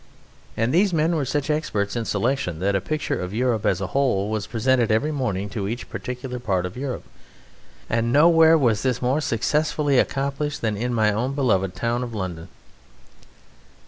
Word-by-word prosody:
And 115 +3 +1
these 190 +3 +4
men 165 +2 +2
were 150 -4 0
such 145 +3 -1
experts 105 -10 -1
in 115 -1 -2
selection 105 - -1
that 100 +4 0
a 95 - +1
picture 155 +4 -2
of 90 +3 -5
Europe 115 -3 +1
as - - +1
a 95 - -2
whole 110 -7 +1
was 110 -2 -2
presented 120 0 +1
every 135 +8 +1
morning 105 -9 -2
to 100 -2 -3
each 115 +4 -5
particular 125 0 -5
part 95 -6 -1
of 90 - -6
Europe; 130 0 -4 0.8
and 115 +1 0
nowhere 160 +3 +6
was 120 -8 +2
this 125 -2 0
more 130 +5 +1
successfully 145 +2 +1
accomplished 140 +2 -1
than 110 -2 0
in 120 +4 -2
my 110 -3 +2
own 125 +6 -2
beloved 95 -9 +1
town 120 +1 -1
of 120 -2 -5
London." 90 -5 -5
120 Hz, 175 wpm, -23 LUFS, 105-140 Hz, 0.8 s, nowhere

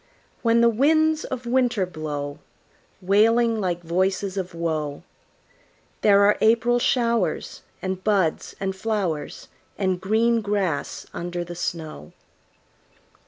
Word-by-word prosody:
When 230 0 +3
the 235 - +6
winds 310 +6 +2
of 255 -1 -5
winter 245 -5 +1
blow, 150 -4 -5 0.6
Wailing 225 +4 +3
like 175 -2 -2
voices 190 +3 0
of 185 -3 -4
woe, 155 -3 -3 1.0
There 200 -1 +5
are 205 +1 +4
April 235 +2 +3
showers, 235 -2 0 0.2
And 185 0 -3
buds 195 -7 0
and 190 -1 -2
flowers, 190 -7 -3 0.3
And 185 -2 0
green 225 +4 +2
grass 200 -7 -2
under 175 0 -4
the 175 0 -8
snow. 160 - -5
195 Hz, 115 wpm, -24 LUFS, 175-230 Hz, 1.0 s, the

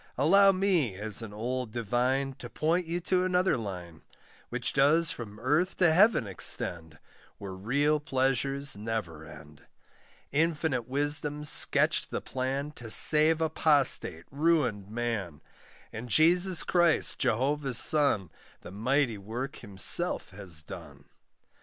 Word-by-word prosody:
Allow 195 +9 +4
me, 185 - 0
as 105 +3 -3
an 110 -2 -9
old 120 +2 -5
divine, 125 +4 -2
To 120 - -9
point 165 +6 -2
you 170 +2 -3
to 180 +1 0
another 185 0 +1
line, 90 -7 -8 0.5
Which - - -4
does 150 +4 +3
from 105 -3 -9
earth 150 +10 -1
to 170 -4 +3
heaven 200 - +3
extend, 85 -4 0 0.4
Where 100 -2 -9
real 140 +10 -1
pleasures 135 -1 -1
never 105 -7 -6
end. 75 0 -15 0.6
Infinite 155 -5 -1
wisdom 145 +2 -2
sketched 150 - +2
the - - -4
plan 135 +3 -4
To 120 -6 -12
save 155 +7 +6
apostate, 145 - +3
ruined 140 -10 -1
man; 110 -9 -4 0.5
And 120 +3 -8
Jesus 175 - +3
Christ, 175 -2 0
Jehovah's 135 +1 -1
son, 140 - +2 0.3
The - - -12
mighty 115 +2 -1
work 120 +7 -7
Himself 110 - 0
has 95 -6 -5
done. - - -12
135 Hz, 125 wpm, -27 LUFS, 110-155 Hz, 0.6 s, save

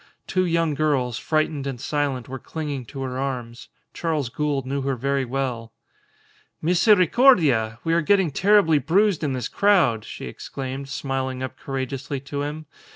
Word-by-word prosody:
Two 185 -2 +1
young 165 -2 +1
girls, 135 -5 0
frightened 155 -3 0
and 130 -3 -4
silent, 140 -3 -2
were 135 +1 -6
clinging 145 -5 -5
to 135 +4 -6
her 130 0 -4
arms. 125 -4 -4 0.3
Charles 155 -7 -1
Gould 145 0 -1
knew 140 +1 -2
her 135 0 -1
very 135 +2 0
well. 120 -3 -3 0.9
"Misericordia! 180 - +4
We 165 - +1
are 170 - +3
getting 190 0 +3
terribly 190 -2 +4
bruised 180 +4 +2
in 140 -3 0
this 125 -3 -2
crowd!" 170 - +3
she - - -8
exclaimed, 135 - -6
smiling 130 -1 -3
up 130 0 -5
courageously 135 +1 -4
to 140 +1 -4
him. 150 +2 -4
140 Hz, 155 wpm, -23 LUFS, 130-160 Hz, 0.9 s, Misericordia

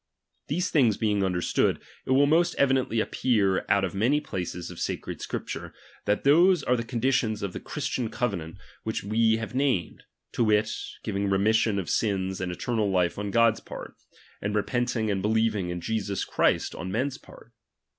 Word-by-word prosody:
These 180 +5 -1
things 120 -9 +4
Vjeing 105 -3 +1
understood, 90 -2 +1 0.3
it - - -1
will 140 +2 +5
most 170 +4 +3
evidently 130 -4 +2
appear 105 -5 +1
out 100 0 +3
of 95 - -2
many 120 +9 +2
places 90 - -5
of 85 - -10
sa - - 0
cred - - -7
Scripture, - - -5 0.3
that 105 +1 +1
those 170 +3 +5
are 125 - +2
the 115 - -2
conditions 115 -2 0
of 100 -2 -3
the - - -5
Christian 120 -3 -3
covenant 100 -9 -3 0.2
which 110 - -3
we 110 +2 +3
have 110 +2 -5
named; 130 -9 0 0.3
to 120 - +1
wit, 110 0 +3 0.3
giving 100 -2 -1
remission 105 +2 +2
of 95 -4 -3
sins 95 -3 0
and 90 -1 -2
eternal 110 +3 -1
life 90 -1 +1
on 105 0 -3
God's 115 +1 +3
part; - - -9 0.5
and 105 +1 -2
repenting 115 0 0
and 95 -1 -1
believing 110 -3 +1
in 90 0 -4
Jesus 100 -1 -2
Christ, - - +1
on 90 +2 -5
men's 130 +6 -1
part. - - -16
110 Hz, 175 wpm, -27 LUFS, 100-120 Hz, 0.5 s, will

